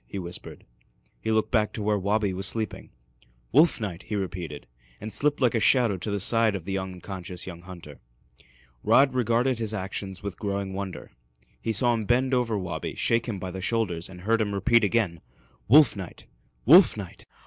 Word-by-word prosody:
he - - -7
whispered. 90 -1 -7 0.6
He 110 - -1
looked 110 0 +1
back 110 -3 +1
to 110 - -4
where 105 0 +1
Wabi 100 0 0
was 95 +1 -2
sleeping. 110 -2 -3 0.6
"Wolf 155 +6 +5
night!" 95 -6 -4
he 110 - -3
repeated, 90 -6 -5 0.3
and 110 0 -7
slipped 145 +7 +1
like 125 -3 +3
a 115 - +2
shadow 120 -3 +3
to 90 - -5
the 100 0 -1
side 115 +1 +2
of 90 -4 -6
the 95 - -3
unconscious 95 -1 -6
young 85 -2 -8
hunter. 85 -5 -11 0.8
Rod 135 -1 +4
regarded 125 0 +1
his 110 -1 -2
actions 95 0 -5
with 100 -2 -6
growing 100 -2 -3
wonder. 95 -1 -6 0.5
He 115 - -1
saw 120 +3 +2
him 110 -2 -2
bend 130 +4 +2
over 120 -4 +1
Wabi, 90 -5 -4
shake 115 +1 +1
him 110 -4 -3
by 95 0 -5
the 95 +1 -6
shoulders, 95 -5 -1
and 90 -1 -11
heard 115 +4 +1
him 105 -2 -1
repeat 115 +4 +3
again, 100 -5 0 0.5
"Wolf 140 +1 +6
night! 95 -4 -9 0.4
Wolf - - +7
night!" - - -9
100 Hz, 185 wpm, -26 LUFS, 95-115 Hz, 0.8 s, Wolf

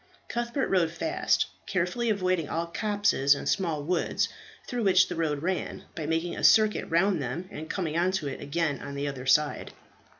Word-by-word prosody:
Cuthbert 240 +3 -1
rode 180 -4 +3
fast, 175 - 0 0.2
carefully 190 +6 0
avoiding 185 -6 0
all 165 +1 -1
copses 200 -6 +2
and - - -6
small 165 -6 0
woods 175 +3 0 0.4
through 245 -2 -3
which 190 -3 +5
the 175 - -3
road 155 -3 -1
ran, 185 +1 -2
by 155 -3 -5
making 165 +2 -1
a - - -6
circuit 215 -1 +4
round 170 0 +2
them 135 +8 -4
and 160 +1 -7
coming 165 -5 -2
on 175 +2 +2
to 180 -6 -1
it 135 - -5
again 150 -1 -1
on 140 0 -7
the 140 +1 -2
other 135 -2 -5
side. 150 +2 +2
170 Hz, 180 wpm, -28 LUFS, 150-190 Hz, 0.4 s, which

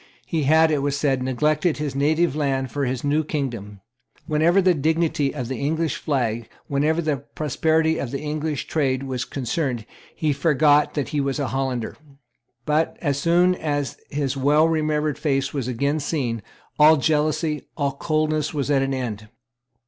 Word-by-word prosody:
He 160 -4 -1
had, 160 +2 +5
it 150 - +1
was 140 0 0
said, 135 -3 +1
neglected 150 +5 +1
his 150 -2 -3
native 155 +2 +2
land 135 -4 -1
for 140 +1 -1
his 125 -1 -3
new 145 +2 +1
kingdom. 120 -10 -4 0.4
Whenever 165 +4 +3
the 185 -1 +4
dignity 160 -2 +1
of 125 -5 -5
the 130 0 -4
English 155 +1 -1
flag, 120 -6 -1 0.2
whenever 155 +4 +1
the 150 -2 0
prosperity 160 +4 0
of 130 - -3
the 140 - -4
English 150 -1 -3
trade 135 -4 0
was 130 -2 -3
concerned, 125 -3 -2 0.3
he 155 -2 0
forgot 150 0 +3
that 145 -3 -2
he 150 - 0
was 135 -1 -1
a 140 -3 -2
Hollander. 130 -4 -2 0.7
But, 155 +2 +1
as 140 -4 -1
soon 175 +4 +3
as 145 -6 -2
his 140 -2 -2
well 145 +4 +3
remembered 155 -2 0
face 135 -3 0
was 135 -4 -2
again 140 +5 0
seen, 130 -7 -2 0.4
all 155 +1 +7
jealousy, 155 +1 0
all 140 -2 0
coldness, 155 +1 -1
was 145 0 -1
at 135 -2 +3
an 135 0 -1
end. 110 -5 -4
145 Hz, 165 wpm, -23 LUFS, 135-155 Hz, 0.7 s, all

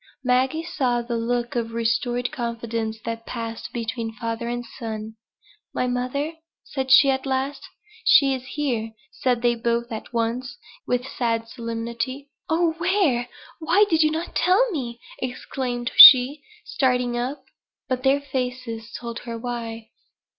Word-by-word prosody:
Maggie 260 +5 +1
saw 255 -8 -1
the 235 0 -3
look 240 +1 -2
of 230 -1 -2
restored 240 +2 0
confidence 230 -2 -3
that 230 0 -5
passed 230 -2 -5
between 230 -1 -4
father 230 +1 -4
and 240 0 -3
son. 220 -2 -6 0.6
"My - - +1
mother?" 255 +6 -2 0.3
said 265 -2 -4
she 275 +1 +8
at 265 +1 -2
last. 270 +1 -2 0.4
"She 275 -10 +6
is 260 -1 -4
here," 235 -7 -2 0.2
said 245 -2 -1
they 240 0 +4
both 235 +1 -1
at 220 - -6
once, 235 - -2 0.3
with 250 0 0
sad 230 -3 -1
solemnity. 235 +4 -5 0.2
"Oh, 330 0 +2
where? 335 -10 +1 0.3
Why 345 +6 +4
did 320 -1 +4
not 325 +2 -2
you - - -23
tell 420 +7 +3
me?" 240 -8 -4 0.2
exclaimed 245 -1 -4
she, 265 +3 +10 0.2
starting 250 -2 0
up. 260 +3 -3 0.4
But 255 -1 -1
their 275 +2 +3
faces 250 -4 -4
told 235 -1 -6
her 235 -1 -6
why. 230 -2 -6
245 Hz, 140 wpm, -23 LUFS, 230-270 Hz, 0.6 s, she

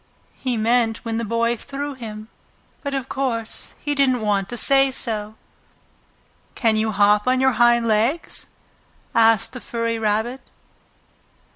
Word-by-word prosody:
He 255 -3 -1
meant 225 0 +1
when 225 0 -2
the - - -2
Boy 230 +2 0
threw 280 +4 -5
him, 215 -4 -8 0.5
but 280 -1 -3
of 265 -1 -3
course 235 -5 -3
he 290 - -1
didn't 265 -4 +2
want 200 -2 0
to 240 - -5
say 270 +3 +4
so. 220 -4 -3 1.2
"Can 225 -3 +2
you 220 0 0
hop 210 +2 +3
on 255 0 +3
your 265 0 +4
hind 240 0 +5
legs?" 230 +9 0 0.7
asked 225 -1 +4
the 255 - -7
furry 230 -1 -2
rabbit. 220 +4 -1
230 Hz, 140 wpm, -22 LUFS, 220-260 Hz, 1.2 s, hind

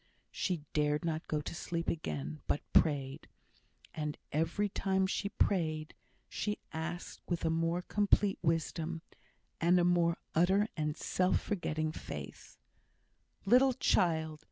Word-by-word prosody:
She 175 -6 -2
dared 150 +1 +1
not 160 -1 -2
go 150 -1 0
to - - -6
sleep 170 0 -3
again, 75 - -3
but - - +1
prayed. 140 -4 +2 0.7
And 150 -1 -3
every 165 +7 +1
time 190 -1 +1
she 200 +1 -1
prayed, 155 -7 0 0.3
she 210 0 -2 0.2
asked 170 +2 -5
with 170 -1 -1
a 160 - +2
more 165 +2 0
complete 205 0 +2
wisdom, 165 0 -1 0.6
and 175 +2 +4
a - - +3
more 175 -1 +3 0.2
utter 190 +5 +4
and 150 -2 -2
self 185 0 +1
forgetting 155 -6 -2
faith. - - -8 0.9
Little 255 +5 +6
child! 160 -8 +1
165 Hz, 130 wpm, -33 LUFS, 155-185 Hz, 0.9 s, Little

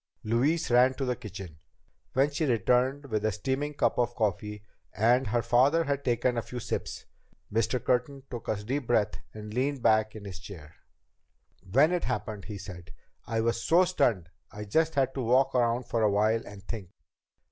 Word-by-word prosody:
Louise 125 +8 +1
ran 125 +2 +5
to 135 - -2
the 125 -1 0
kitchen. 95 -8 -9 0.5
When 135 +2 +3
she 150 +2 -1
returned 125 +4 +2
with 110 -5 -2
a 110 - +2
steaming 135 +8 -2
cup - - +1
of 120 0 0
coffee, 105 -1 -2 0.3
and 120 +4 +3
her 115 +2 0
father 130 +8 +4
had 140 -2 -2
taken 120 0 +1
a - - -2
few 125 +2 -7
sips, - - -4 0.5
Mr. 115 +3 +1
Curtin 130 +2 0
took 120 -2 -6
a 110 - +1
deep 130 +3 -3
breath 105 -6 +1
and 105 0 -9
leaned 130 +1 -1
back 110 0 +3
in 105 -1 -9
his 95 -2 -7
chair. 85 -6 -11 1.0
"When 140 - +5
it 180 -1 0
happened," 105 -2 -3
he 105 -2 -6
said, 90 -3 -9 0.4
"I 115 0 0
was 115 0 0
so 175 +3 +5
stunned 120 - +1 0.2
I 105 +1 -7
just 160 +9 +1
had 135 -1 +2
to 135 - -3
walk 125 +3 +3
around 120 0 +2
for 115 -1 -2
a 105 - +4
while 110 +3 +2
and 100 -1 -11
think." 100 -3 -6
120 Hz, 185 wpm, -28 LUFS, 105-135 Hz, 1.0 s, ran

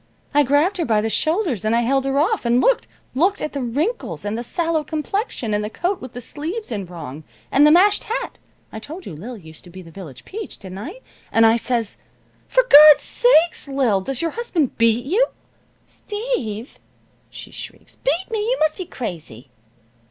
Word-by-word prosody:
I 290 - +5
grabbed 290 +8 +2
her 340 - -1
by 220 -3 +2
the 220 +1 -2
shoulders, 315 - 0
and 215 +1 +1
I 235 - +3
held 265 +3 +1
her 270 0 0
off, 375 +10 +1
and 240 +1 +2
looked - - +2 0.3
looked 365 +9 +2
at 305 - -4
the 280 - -3
wrinkles, 250 - -2
and 205 +1 -2
the 235 - -3
sallow 325 +5 0
complexion, 305 - -3
and 210 0 0
the 210 - -3
coat 360 - -2
with 255 -2 -9
the 245 - -7
sleeves 320 - -4
in 200 -5 -4
wrong, 160 -4 -8 0.3
and 290 +2 +6
the - - +6
mashed 390 +5 +4
hat 460 - -4 0.3
(I 220 - -7
told 320 +10 -9
you - - -7
Lil 230 +10 -8
used 160 -4 -13
to - - -13
be 185 +1 -11
the 165 - -14
village 160 -8 -11
peach, 430 +2 -7
didn't 190 -1 -9
I?) 345 - -8 0.3
and 225 0 +5
I 225 0 +5
says: 235 -2 -2 0.5
"'For - - +3
Gawd's 305 - +8
sakes, 345 -11 +3
Lil, 260 -8 +1
does 270 - -3
your 330 - 0
husband 360 - -1
beat 230 +1 +3
you?' 425 - +2 0.6
"'Steve!' 305 - -5 0.5
she - - -10
shrieks, - - -10
'beat 380 -7 -1
me! 445 - -1
You 465 +4 0
must 310 +3 +1
be 370 - -4
crazy!' 155 - -8
275 Hz, 195 wpm, -21 LUFS, 220-350 Hz, 0.6 s, Gawd's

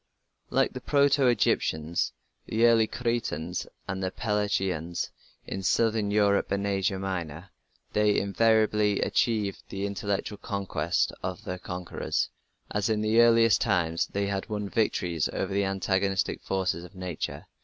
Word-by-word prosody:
Like - - +2
the - - -6
proto 140 -1 +3
Egyptians, 80 -8 +1 0.4
the 115 +2 +2
early 115 -2 +5
Cretans, 105 -10 -2 0.2
and 95 -1 -3
the 95 - 0
Pelasgians 95 -6 -1 0.3
in 95 - -4
southern 110 +1 +2
Europe 100 -1 +2
and 100 0 0
Asia 95 -1 0
Minor, 90 -2 -4 0.4
they 105 -1 +3
invariably 105 0 +3
achieved 105 -4 0
the 100 0 -3
intellectual 100 0 -3
conquest 95 -6 -1
of - - -4
their 90 0 -5
conquerors, 90 -1 -3 0.4
as 105 +1 0
in 110 -1 +1
the 110 +2 +3
earliest 115 -1 +5
times 85 -6 +1
they 100 0 -2
had 100 +1 -3
won 105 -2 -3
victories 90 -8 0
over - - -2
the 100 0 +1
antagonistic 95 0 0
forces 95 -3 -1
of 90 +3 -13
nature. 90 -3 -5
100 Hz, 135 wpm, -28 LUFS, 95-110 Hz, 0.4 s, early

